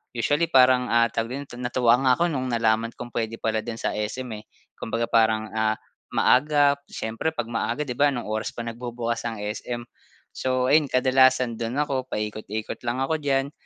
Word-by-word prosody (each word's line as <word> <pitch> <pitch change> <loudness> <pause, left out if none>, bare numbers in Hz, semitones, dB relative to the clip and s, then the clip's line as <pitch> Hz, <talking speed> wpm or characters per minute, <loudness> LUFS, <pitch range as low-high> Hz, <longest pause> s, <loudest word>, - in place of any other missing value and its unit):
Usually 145 +8 +1
parang, 130 -4 +5
ah 115 0 +3
tawag 115 +3 -2
din 140 - -5
ton 120 - -10
natuwa 120 -1 +3
nga 130 -1 +4
ako 175 +3 +1
no'ng 130 -3 -2
nalaman 115 -1 +1
kong 120 0 -8
puwede 115 -1 -2
pala 110 0 0
dun 115 +1 -5
sa - - -2
SM, 115 +4 -4
eh. 105 - -18 0.3
Kumbaga 115 +1 -2
parang 110 -1 +2
ah 110 0 +1 0.4
maaga, 145 +1 +4
siyempre 115 +9 -3
'pag 115 - -4
maaga, 120 +4 -1
'di 125 -4 -6
ba, 145 - +6
anong 120 -6 -3
oras 110 0 -3
pa 120 - -4
nagbubukas 120 0 -4
ang 110 -3 -5
SM. 120 +3 -4 0.5
So, 130 0 0
ayun 150 0 +5
kadalasan 130 -2 +3
do'n 115 +1 -3
ako 130 -3 -3
paikot-ikot 105 -1 -4
lang 125 +3 0
ako 160 +4 0
diyan. 140 -1 0
120 Hz, 185 wpm, -25 LUFS, 115-130 Hz, 0.5 s, ba